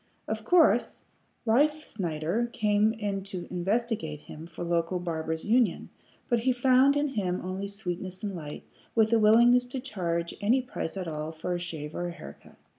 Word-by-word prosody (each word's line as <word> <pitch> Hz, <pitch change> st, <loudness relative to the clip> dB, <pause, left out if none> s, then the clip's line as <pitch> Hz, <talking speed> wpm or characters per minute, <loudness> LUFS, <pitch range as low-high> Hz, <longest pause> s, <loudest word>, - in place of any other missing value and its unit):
Of 220 Hz, 0 st, -3 dB
course 350 Hz, +5 st, +3 dB, 0.4 s
Riefsnyder 230 Hz, -, 0 dB
came 210 Hz, 0 st, +3 dB, 0.3 s
to 190 Hz, -2 st, -7 dB
investigate 185 Hz, -4 st, -1 dB
him 160 Hz, +2 st, -10 dB
for 170 Hz, 0 st, -7 dB
the 170 Hz, -, -4 dB
local 170 Hz, +2 st, +1 dB
Barbers' 160 Hz, -2 st, -3 dB
Union, 230 Hz, -3 st, +2 dB, 0.4 s
but 240 Hz, -2 st, +2 dB
he 255 Hz, +3 st, +2 dB
found 260 Hz, +3 st, +4 dB
in 290 Hz, 0 st, +1 dB
him 190 Hz, -8 st, -1 dB
only 190 Hz, +2 st, -3 dB
sweetness 185 Hz, -2 st, -6 dB
and 200 Hz, -2 st, -3 dB
light, 150 Hz, -3 st, -7 dB, 0.3 s
with 220 Hz, 0 st, +4 dB
a 230 Hz, -, +5 dB
willingness 240 Hz, +3 st, +6 dB
to 255 Hz, +1 st, -4 dB
charge 170 Hz, -9 st, -2 dB
any 230 Hz, +6 st, +3 dB
price 250 Hz, -8 st, -5 dB
at 185 Hz, -2 st, -4 dB
all 155 Hz, 0 st, -4 dB
for 160 Hz, +3 st, -4 dB
a 175 Hz, -, -2 dB
shave 160 Hz, -4 st, -6 dB
or 175 Hz, -, -3 dB
a 175 Hz, -, -5 dB
haircut. -, -, -12 dB
200 Hz, 170 wpm, -28 LUFS, 170-235 Hz, 0.4 s, willingness